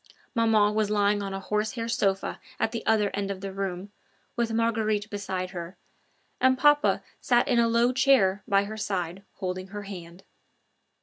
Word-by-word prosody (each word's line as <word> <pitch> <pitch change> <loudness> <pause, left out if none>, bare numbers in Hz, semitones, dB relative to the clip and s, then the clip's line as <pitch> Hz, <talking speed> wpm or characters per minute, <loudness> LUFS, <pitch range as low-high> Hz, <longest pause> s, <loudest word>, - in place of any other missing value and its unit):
Maman 220 -3 +3
was 215 -1 +1
lying 205 0 +2
on 195 -1 -4
a 195 - -4
horsehair 215 +4 -2
sofa 195 -4 0 0.2
at 220 - +1
the 230 - -4
other 210 -2 +3
end 200 -1 -2
of 195 -1 -4
the 195 -1 -5
room, 195 0 -4 0.4
with 235 -1 0
Marguerite 220 -2 0
beside 190 -3 -3
her, 175 0 -7 0.6
and 260 0 +4
papa 295 +1 +4 0.2
sat 240 -1 +2
in 245 -2 +3
a 230 - +4
low 235 +2 +3
chair 250 -8 +4
by 200 -2 +3
her 215 +2 -6
side, 190 -4 -3
holding 185 -1 -4
her 205 +1 -7
hand. 180 -2 -9
205 Hz, 170 wpm, -27 LUFS, 195-230 Hz, 0.6 s, and